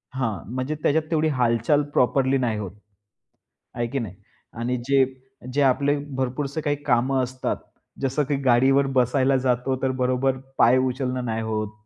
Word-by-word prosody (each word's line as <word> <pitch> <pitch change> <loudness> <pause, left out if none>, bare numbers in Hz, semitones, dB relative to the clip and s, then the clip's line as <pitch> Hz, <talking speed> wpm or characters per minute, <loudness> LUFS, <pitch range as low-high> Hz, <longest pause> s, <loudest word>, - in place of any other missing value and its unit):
हां, 115 -6 -2
म्हणजे 130 +4 -2
त्याच्यात 155 +2 +2
तेवढी 160 0 +2
हालचाल 125 +1 +2
प्रॉपरली 135 +1 +2
नाही 120 -4 0
होत. 100 -4 -5 1.0
आहे 120 0 -1
की 135 +4 -3
नाही? 110 -7 -5 0.4
आणि 120 +2 -2
जे 135 -1 +5 0.5
जे 145 +2 +2
आपले 140 +2 +3 0.2
भरपूरसे 135 +3 -2
काही 145 -1 0
कामं 130 -1 +2
असतात, 130 +1 -3 0.5
जसं 135 +2 +1
की 145 - +1
गाडीवर 135 +2 +4
बसायला 130 +2 +3
जातो, 130 0 0
तर 135 - +1
बरोबर 130 +1 +1 0.2
पाय 125 +3 +5
उचलणं 130 -1 -1
नाही 115 -1 -2
होत. 110 -1 -3
130 Hz, 150 wpm, -24 LUFS, 120-135 Hz, 1.0 s, जे